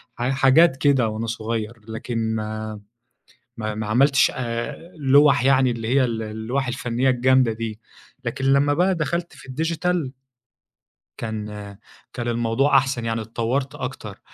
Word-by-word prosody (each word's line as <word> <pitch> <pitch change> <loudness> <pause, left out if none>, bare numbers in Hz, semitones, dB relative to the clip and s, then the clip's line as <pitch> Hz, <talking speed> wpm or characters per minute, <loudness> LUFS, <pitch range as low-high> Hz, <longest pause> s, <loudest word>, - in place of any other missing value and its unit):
ح 120 +2 -1
حاجات 135 +3 +4
كده، 135 -5 +3
وأنا 110 +1 -3
صغير، 115 0 -4
لكن 110 0 -3
ما 110 0 -4 0.8
ما 110 -1 -3
ما 110 0 -4
عملتش 135 +6 +4
آآ، 130 +7 -5
لوَح 140 -1 +4
يعني 130 -1 +4
اللي 115 -1 -4
هي 130 +1 +3
ال 115 -2 -2
اللوَح 110 +5 -3
الفنية 125 +1 0
الجامدة 130 -1 +3
دي، 110 -1 -5 0.4
لكن 120 +3 -3
لمّا 140 +2 +3
بقى 185 +3 +2
دخلت 170 +2 -2
في - - -15
الdigital 165 +1 -1 1.1
كان 110 -2 -4 0.7
كان 120 -1 -4
الموضوع 120 +4 +2
أحسن 130 -3 +1
يعني 115 0 -1
اتطوّرت 120 +5 -2
أكتر، 125 -6 -7
125 Hz, 140 wpm, -23 LUFS, 115-135 Hz, 1.1 s, حاجات